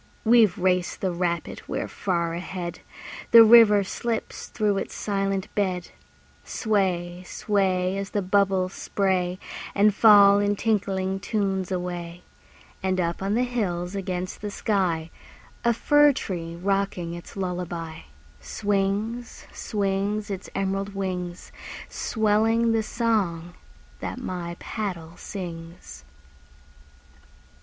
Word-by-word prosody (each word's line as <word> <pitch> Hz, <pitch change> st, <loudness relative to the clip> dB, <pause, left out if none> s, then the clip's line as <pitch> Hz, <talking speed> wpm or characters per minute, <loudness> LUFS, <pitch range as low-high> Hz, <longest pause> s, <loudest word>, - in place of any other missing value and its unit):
We've 225 Hz, -4 st, +5 dB
raced 180 Hz, -1 st, 0 dB
the 190 Hz, -, 0 dB
rapid, 170 Hz, -1 st, -2 dB
we're -, -, -3 dB
far 170 Hz, -4 st, -1 dB
ahead! 175 Hz, 0 st, -5 dB, 0.5 s
The 230 Hz, -1 st, +10 dB
river 220 Hz, -3 st, +7 dB
slips 230 Hz, +3 st, -4 dB
through 205 Hz, -3 st, 0 dB
its -, -, -6 dB
silent 195 Hz, -2 st, -1 dB
bed. 185 Hz, -3 st, -1 dB, 0.5 s
Sway, 180 Hz, -5 st, -1 dB
sway, 190 Hz, -1 st, 0 dB
As 195 Hz, 0 st, -4 dB
the 205 Hz, -, -1 dB
bubbles 190 Hz, -1 st, +2 dB
spray 185 Hz, -2 st, 0 dB, 0.4 s
And 205 Hz, +1 st, +4 dB
fall 205 Hz, -2 st, +7 dB
in 205 Hz, 0 st, +1 dB
tinkling 195 Hz, -3 st, 0 dB
tunes 195 Hz, -3 st, -1 dB
away. 175 Hz, -1 st, -4 dB, 0.6 s
And 185 Hz, -1 st, 0 dB
up 170 Hz, 0 st, -1 dB
on 195 Hz, +2 st, 0 dB
the 245 Hz, -, +2 dB
hills 190 Hz, -8 st, -2 dB
against 185 Hz, -2 st, -4 dB
the 210 Hz, -, -3 dB
sky, 180 Hz, -6 st, -1 dB, 0.5 s
A 235 Hz, -, +4 dB
fir 290 Hz, +5 st, +4 dB
tree 170 Hz, -9 st, -5 dB
rocking 190 Hz, -2 st, -1 dB
its 175 Hz, +3 st, -10 dB
lullaby, 175 Hz, -3 st, -4 dB, 0.4 s
Swings, 205 Hz, +4 st, -2 dB
swings, 205 Hz, +1 st, -2 dB
Its 195 Hz, -1 st, -6 dB
emerald 195 Hz, +1 st, -2 dB
wings, 180 Hz, -2 st, -4 dB, 0.4 s
Swelling 225 Hz, +1 st, +1 dB
the 225 Hz, 0 st, +2 dB
song 200 Hz, -8 st, -1 dB, 0.5 s
that -, -, -5 dB
my 175 Hz, -7 st, -5 dB
paddle 175 Hz, -7 st, -5 dB
sings. 165 Hz, -, -8 dB
195 Hz, 115 wpm, -25 LUFS, 180-210 Hz, 0.6 s, The